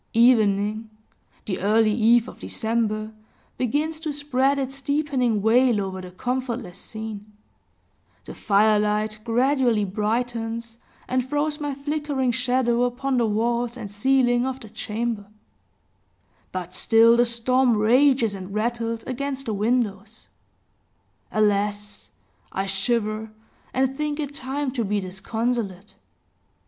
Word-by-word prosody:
Evening 215 -2 +3 0.6
the 190 - -3
early 215 +2 +3
eve 230 +1 +4
of - - -11
December 220 -1 -1 0.5
begins 300 +6 -1
to 315 -2 -3
spread 280 -1 +1
its 270 0 -4
deepening 270 -7 0
veil 235 0 +4
over 190 -1 -4
the 180 - -9
comfortless 245 -1 -4
scene; 220 -1 -8 0.9
the - - -8
firelight 210 +1 +2
gradually 240 -2 +2
brightens, 230 +2 -2 0.3
and 255 0 +1
throws 295 +3 -1
my 290 -2 -3
flickering 285 -2 -1
shadow 250 -1 +1
upon 250 +2 0
the 235 - +2
walls 235 +3 0
and 210 -4 -7
ceiling 245 +2 +2
of 260 0 -3
the 220 - -11
chamber; 220 0 -3 1.2
but 180 -1 -5
still 225 +4 +5
the 240 - +5
storm 240 +1 +2
rages 240 +1 +4
and 195 +1 -7
rattles, 230 0 -1
against 270 +1 -4
the 220 - -2
windows. 215 -1 -1 1.0
Alas! 205 -1 0 0.4
I 195 - -2
shiver, 215 +2 -1 0.4
and 265 +1 0
think 300 +1 -2
it 290 -2 -3
time 275 0 -3
to 245 -3 -1
be 205 0 0
disconsolate. 200 +1 -3
235 Hz, 120 wpm, -24 LUFS, 210-260 Hz, 1.2 s, still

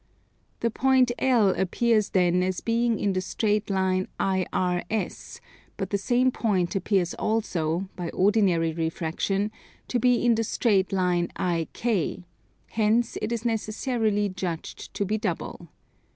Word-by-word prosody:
The 230 - +1
point 260 0 +3
L 240 -6 +4
appears 215 +3 +1
then 180 -1 +3
as 185 0 -1
being 230 0 +1
in 200 -1 0
the 185 - 0
straight 210 +2 -1
line 190 -1 +1
IRS; 185 +1 -1 0.4
but 195 -1 -4
the 200 - +2
same 250 +4 +2
point 190 -8 0
appears 190 -2 +1
also, 185 -5 -1
by 175 -2 -4
ordinary 185 -5 +2
refraction, 165 +5 -1 0.4
to 245 - +1
be 245 +1 +3
in 240 - +5
the 225 0 +1
straight 205 -4 +1
line 180 -2 +1
IK, 180 +2 -1 0.5
hence 225 +2 +1
it 220 - -2
is 235 0 -3
necessarily 220 -1 0
judged 185 -4 -5
to 200 - 0
be 215 +3 -1
double. - - -4
200 Hz, 135 wpm, -26 LUFS, 180-225 Hz, 0.5 s, in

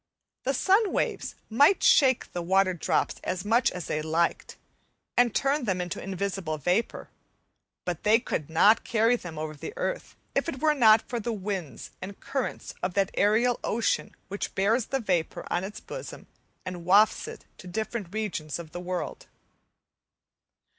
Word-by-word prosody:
The 270 +1 +1
sun 390 - +3
waves - - -2
might 285 - +4
shake 280 - +4
the 175 - -2
water 190 +2 +3
drops 175 - 0
as 185 +1 -3
much 235 +3 +3
as 180 -2 -6
they 155 - -2
liked 160 +2 -1 0.6
and 245 -1 +4
turn 275 +3 +1
them 190 -4 0
into 175 -1 -4
invisible 190 -4 -3
vapour, 180 - -1 0.7
but 175 -2 -3
they 215 +2 +5
could 155 - -3
not 200 +7 +5
carry 230 +1 +3
them 175 -9 -8
over 155 0 -4
the 155 - -8
earth - - -3 0.2
if - - 0
it 265 - -5
were 310 +1 +3
not 225 -6 +5
for 240 - -3
the 235 +2 -3
winds 195 -7 -5
and 195 +1 -8
currents 270 -2 -4
of 180 -1 -2
that 195 -1 +2
aerial 230 +4 +2
ocean 225 0 0
which 200 +1 -5
bears 220 +5 +2
the 270 - -1
vapour 180 -8 -1
on 175 - 0
its 200 +2 -6
bosom, - - -8 0.4
and 180 -2 -6
wafts 200 +5 +4
it - - -9
to 185 - -11
different 215 0 -4
regions 200 -8 -3
of 165 -2 -9
the 175 - -6
world. 180 0 -4
200 Hz, 165 wpm, -27 LUFS, 180-240 Hz, 0.7 s, they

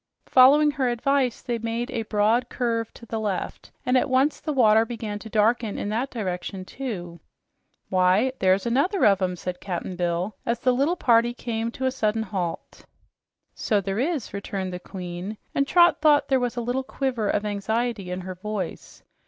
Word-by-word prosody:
Following 290 +4 +6
her 270 -4 0
advice, 255 +1 0
they 240 -2 -2
made 230 +3 -3
a 235 -3 -2
broad 220 +3 +1
curve 230 -2 -1
to 235 - -12
the 225 -1 -4
left, 205 -4 -4 0.2
and 250 - +2
at 255 - +2
once 265 +3 +2
the 310 - -3
water 220 -5 +5
began 220 -3 -5
to 220 - -10
darken 220 0 +1
in 205 - -3
that 235 +5 -1
direction. 185 -4 -4 1.2
"Why, 185 +7 +3
there's 190 +2 +3
another 285 - +2
of 200 -2 +4
'em," 180 -1 0
said 180 0 -6
Cap'n 180 -1 -4
Bill 175 +3 -1
as 235 +1 0
the 255 - +3
little 280 +8 +1
party 240 -5 +3
came 230 -2 -3
to 260 - -3
a 260 - +2
sudden 220 -3 0
halt. 185 -5 -5 0.7
"So 210 -3 0
there 195 +1 -3
is," 285 - -2
returned 195 -2 -4
the 180 - -5
Queen, 180 +2 -7 0.2
and 275 0 +1
Trot 345 0 +5
thought 300 -2 +4
there 265 -1 +3
was 245 -1 -2
a - - 0
little 245 +3 -1
quiver 255 -6 -2
of 210 - 0
anxiety 210 0 -2
in 180 +1 -4
her 185 +1 -6
voice. 190 -1 -6
225 Hz, 180 wpm, -25 LUFS, 195-255 Hz, 1.2 s, Following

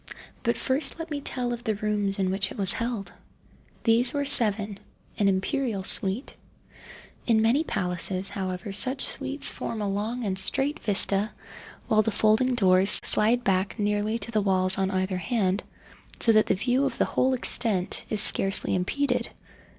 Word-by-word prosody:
But 235 - -1
first 270 +3 -1
let 330 -1 -8
me 290 -1 -4
tell 245 -3 -3
of 240 0 -8
the 220 -2 -2
rooms 205 -1 -2
in 190 -2 -1
which 195 0 -1
it - - -10
was 195 -2 +2
held. 230 -4 -5 0.7
These 235 +1 +2
were 285 0 -1
seven—an 205 -4 +1
imperial 200 +2 -2
suite. 195 +6 +2 0.9
In 220 -2 +2
many 250 +8 +2
palaces, 185 - -1
however, 190 +1 -5
such 260 +7 -1
suites 275 +1 -3
form 225 - -6
a 205 - -3
long 215 +5 -4
and 190 -2 -1
straight 280 +8 +1
vista, 200 0 +2 0.6
while 215 0 +3
the 215 - -1
folding 220 +4 +1
doors 190 -2 +4
slide 235 +3 +2
back 190 0 -1
nearly 210 +1 -1
to 230 +1 -4
the 215 -2 0
walls 190 -1 0
on 190 0 0
either 185 -1 -2
hand, 195 -1 -1 0.6
so 230 - +3
that 215 -1 +3
the - - +1
view 250 +7 0
of - - -7
the - - +1
whole 260 0 0
extent 220 -7 +1
is 215 -2 +1
scarcely 195 +1 +5
impeded. 250 +8 -1
215 Hz, 165 wpm, -25 LUFS, 195-245 Hz, 0.9 s, scarcely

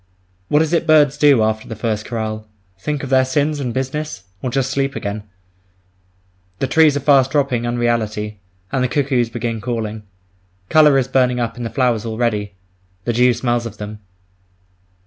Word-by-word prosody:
What 150 +2 +3
is 160 +1 -3
it 170 0 +1
birds 150 -3 +5
do 140 -6 +5
after 110 0 -1
the 115 - -6
first 110 -1 -2
Chorale? 110 -2 -4 0.3
Think 150 +5 -3
of 135 - -5
their 130 0 +5
sins 145 +3 0
and 125 -4 -2
business? 135 -2 -4 0.2
Or 130 - -2
just 135 +1 -1
sleep 135 0 -1
again? 100 +1 -4 1.4
The - - -1
trees 150 +1 +4
are - - -3
fast 135 -2 +4
dropping 135 -5 0
unreality, 110 -3 -1 0.3
and 130 - 0
the - - +2
cuckoos 130 -4 0
begin 115 -1 -3
calling. 110 -3 -3 0.7
Colour 150 -3 +6
is 130 -2 +1
burning 125 -2 +2
up 115 -1 -2
in 120 - -8
the 115 - -3
flowers 120 -2 +1
already; 110 -3 -2 0.5
the 120 - -1
dew 125 +2 +4
smells 120 -1 -1
of 110 -2 -11
them. 105 +1 -7
125 Hz, 170 wpm, -19 LUFS, 110-135 Hz, 1.4 s, Colour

